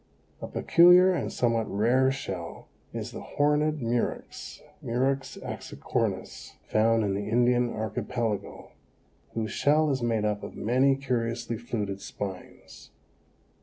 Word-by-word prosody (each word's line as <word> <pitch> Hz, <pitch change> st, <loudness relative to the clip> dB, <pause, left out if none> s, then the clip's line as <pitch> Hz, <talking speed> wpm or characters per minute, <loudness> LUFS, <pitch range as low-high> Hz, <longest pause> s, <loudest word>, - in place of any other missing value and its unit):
A -, -, -4 dB
peculiar 180 Hz, +2 st, +6 dB
and 175 Hz, -, -2 dB
somewhat 115 Hz, -3 st, 0 dB
rare 125 Hz, +6 st, +3 dB
shell 95 Hz, -11 st, -6 dB, 0.2 s
is -, -, -5 dB
the -, -, -7 dB
Horned 150 Hz, 0 st, +1 dB
Murex 115 Hz, +1 st, -3 dB, 0.2 s
(Murex 135 Hz, +3 st, -1 dB
axicornis), -, -, -4 dB
found 115 Hz, +1 st, +3 dB
in 100 Hz, -2 st, 0 dB
the 100 Hz, +1 st, -3 dB
Indian 120 Hz, +1 st, +3 dB
Archipelago, 110 Hz, 0 st, -3 dB, 0.6 s
whose 110 Hz, -2 st, -2 dB
shell 150 Hz, +3 st, +3 dB
is 135 Hz, -2 st, -1 dB
made 115 Hz, -3 st, 0 dB
up 105 Hz, -1 st, -1 dB
of -, -, -8 dB
many 130 Hz, +5 st, +3 dB
curiously 120 Hz, -3 st, -2 dB
fluted 105 Hz, -4 st, -4 dB
spines. 95 Hz, -2 st, -8 dB
120 Hz, 120 wpm, -27 LUFS, 110-135 Hz, 0.6 s, peculiar